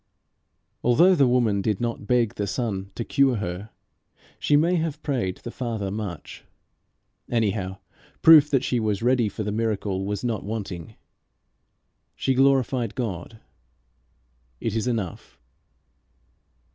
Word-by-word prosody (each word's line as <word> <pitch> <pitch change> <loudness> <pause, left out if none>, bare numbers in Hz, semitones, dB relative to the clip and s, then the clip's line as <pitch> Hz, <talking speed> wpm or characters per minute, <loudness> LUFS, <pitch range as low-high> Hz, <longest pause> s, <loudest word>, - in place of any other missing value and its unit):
Although 165 +10 +5
the 140 -7 +4
woman 120 -5 +2
did 105 -1 -1
not 115 -3 -3
beg 120 -4 +2
the 100 - -3
Son 100 -4 -3
to 115 - -4
cure 135 -2 +3
her, 95 0 -4 0.7
she 145 - +2
may 170 +4 +3
have 160 -2 -3
prayed 125 - -1
the 120 - -8
Father 115 -6 -3
much. 95 -7 -6 0.9
Anyhow 100 -5 -1 0.5
proof 155 -2 +8
that 135 -3 +2
she 125 - 0
was 110 -1 -1
ready 120 -3 +3
for 105 +2 -5
the 105 - -2
miracle 105 -3 -2
is 105 +1 -3
not 115 -4 -2
wanting. 100 -5 -6 1.2
She 135 - 0
glorified 130 -4 +2
God. 110 -2 -5 1.2
It 115 - -2
is 110 +2 -1
enough. 110 -8 -4
115 Hz, 130 wpm, -24 LUFS, 100-125 Hz, 1.2 s, proof